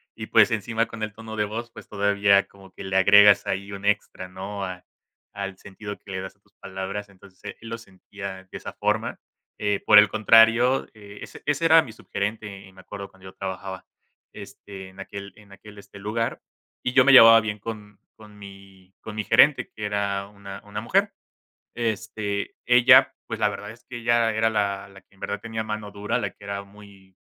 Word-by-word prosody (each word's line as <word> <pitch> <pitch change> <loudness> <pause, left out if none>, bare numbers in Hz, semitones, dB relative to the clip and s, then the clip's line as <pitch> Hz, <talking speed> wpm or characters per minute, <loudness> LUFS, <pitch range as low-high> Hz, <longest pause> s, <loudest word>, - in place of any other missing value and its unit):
y - - -7
pues, - - +5
encima 115 +1 -1
con 115 - -10
el 110 -1 -4
tono 110 0 -9
de 105 - +1
voz, 115 +3 -6
pues, - - -13
todavía 100 -1 +2
como 95 -1 -18
que - - -10
le 95 0 -4
agregas 100 +1 +6
ahí 100 +1 -3
un 100 0 -8
extra, 100 -2 -1
¿no? 95 +2 -7
A 90 -1 -8 0.5
al 100 -1 -6
sentido 105 +1 -9
que - - -18
le 95 0 -4
das 95 - -9
a - - -39
tus 100 0 -35
palabras, 95 +2 -6
entonces 95 -1 -19
e 105 - -7
él 115 - -10
lo 115 - -4
sentía 95 -2 -10
de - - -7
esa - - -8
forma, - - -2 0.4
eh, 105 -1 0
por 105 - +9
el 105 0 +5
contrario, 115 +4 +4
eh, 105 -1 -13
ese - - -11
ese 145 +2 0
era 165 0 +6
mi 120 - -10
subgerente, 100 -2 -5
eh, 95 - -18
me 95 - -15
acuerdo 100 +1 -9
cuando 95 -1 -20
yo - - -16
trabajaba, 95 -1 -6 0.5
este, 95 -2 -11
en 95 +1 -18
aquel 100 0 -8
en 105 -2 -19
aquel, 105 +1 -14
este, 100 0 -13
lugar, 110 +3 -3 0.4
y 125 - -2
yo 130 -1 +5
me 140 - +6
llevaba 115 -3 +10
bien 105 -1 -4
con 105 -2 -9 0.2
con 105 -1 -16
mi 95 -2 -14
con 110 - -9
mi 110 - -2
gerente, 145 +6 +4
que 105 - -7
era 100 -1 -2
una 100 -1 -11
una 105 +1 -6
mujer. 195 - +1 0.6
Este, 110 -3 -3
ella, 125 0 +6
pues, - - -6
la 105 - +3
verdad 105 0 -7
es 120 +2 -20
que 125 - -9
ella 120 -1 +2
era 110 +1 +1
la 100 -2 -2
la 95 0 -15
que - - -31
en 95 - -25
verdad - - -4
tenía 110 -1 -5
mano 105 -1 -5
dura, 100 +1 -2
la - - -3
que 100 - -18
era 100 0 -5
muy 100 -2 -18
105 Hz, 210 wpm, -24 LUFS, 100-110 Hz, 0.6 s, llevaba